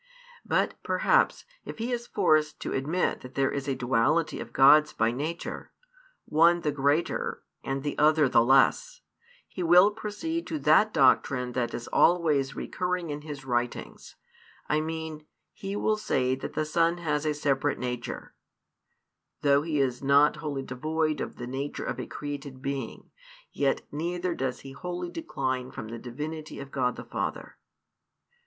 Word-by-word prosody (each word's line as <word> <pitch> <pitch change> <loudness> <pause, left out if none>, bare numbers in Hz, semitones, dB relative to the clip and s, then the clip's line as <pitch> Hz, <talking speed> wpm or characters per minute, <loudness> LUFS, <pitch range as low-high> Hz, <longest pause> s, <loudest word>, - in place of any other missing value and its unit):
But, - - 0
perhaps, - - +2 0.2
if - - -8
he 230 +2 -3
is 240 -1 -3
forced 155 -6 +2
to - - -3
admit 155 +7 0
that 125 0 -11
there 135 -1 +2
is 140 -1 -4
a 135 - 0
duality 130 +6 +1
of - - -7
Gods 150 +3 +6
by 115 +1 +1
nature, 155 +7 -5 0.6
one 170 +3 +4
the 150 - 0
greater 145 +3 0 0.2
and 135 0 -3
the 145 - -2
other 150 -1 +5
the 115 - +4
less, 135 - +3 0.5
he 185 - -7
will 180 +4 +6
proceed 225 +11 -4
to 315 - -2
that 215 -6 +4
doctrine 130 -3 +3
that 120 -1 -2
is 120 - -6
always 150 -6 +3
recurring 180 -3 -3
in 145 0 -5
his 145 -3 -8
writings; 120 -1 -3 0.5
I 150 +1 +1
mean, 160 -1 -5 0.3
he 195 0 -5
will 215 +1 +1
say 130 -12 0
that 130 - -5
the 155 - -1
Son 165 +2 +2
has 150 -4 -1
a 155 -1 0
separate 145 -1 0
nature 125 -1 -5 1.1
though 140 -1 +4
He 155 -1 -1
is 125 -2 0
not 140 +2 +4
wholly 145 -3 -4
devoid 155 +4 -1
of - - -5
the 120 - -6
nature 135 +3 -4
of 125 - -4
a 125 - -5
created 140 -2 -6
being, 135 0 -5 0.4
yet 135 -1 0
neither 175 +4 -2
does 130 -4 -3
He 135 - -10
wholly 175 +4 -5
decline 130 - -3
from 110 - -8
the 115 0 -6
Divinity 150 +6 -6
of 140 -1 -9
God 125 -2 0
the - - -9
Father. - - -5
150 Hz, 160 wpm, -27 LUFS, 135-170 Hz, 1.1 s, Gods